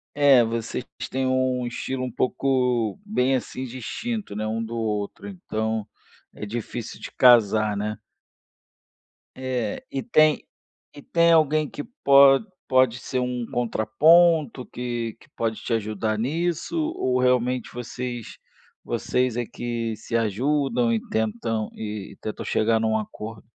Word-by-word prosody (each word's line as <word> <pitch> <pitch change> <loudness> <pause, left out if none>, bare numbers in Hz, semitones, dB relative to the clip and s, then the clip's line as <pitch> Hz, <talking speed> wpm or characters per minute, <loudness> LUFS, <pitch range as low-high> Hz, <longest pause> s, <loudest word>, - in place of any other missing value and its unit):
É, 140 -4 +6
vocês 115 +2 -3 0.3
tem 130 0 -1
um 130 -1 +1
estilo 130 +2 -3
um 125 - -3
pouco, 125 -4 0
bem 135 -11 +1
assim 130 0 -3
distinto, 130 - -5
né, 110 0 -2
um 110 +1 -2
do 115 +1 -5
outro, 105 - -3
então 110 - -3 0.5
é - - -6
difícil 115 +1 -6
de - - -7
casar, 110 -4 +5
né? 105 +1 -3 1.4
Eh, 125 -5 -3
e 135 - -3
tem 155 -1 +3 0.5
e 145 - -10
tem 170 +3 +3
alguém 155 -2 +3
que 145 - -6 0.2
pode 140 +3 +7 0.2
pode 130 -2 +3
ser 130 - -3
um 125 -1 -2
contraponto, 140 +5 +3
que 120 -2 -4
que - - -20
pode 110 -1 -1
te - - -3
ajudar 110 -1 -1
nisso 165 - -1 0.2
ou 125 0 +1
realmente 125 -1 +1
vocês 120 -1 -6 0.5
vocês 125 -2 0
é 120 - 0
que 115 -2 -3
se 115 - -3
ajudam 120 +2 +1
e 115 - +1
tentam 110 0 -1
e 105 -2 -6
tentam 110 - -5
chegar 110 +1 +2
num 110 0 +1
acordo? 110 0 -7
120 Hz, 135 wpm, -24 LUFS, 110-130 Hz, 1.4 s, pode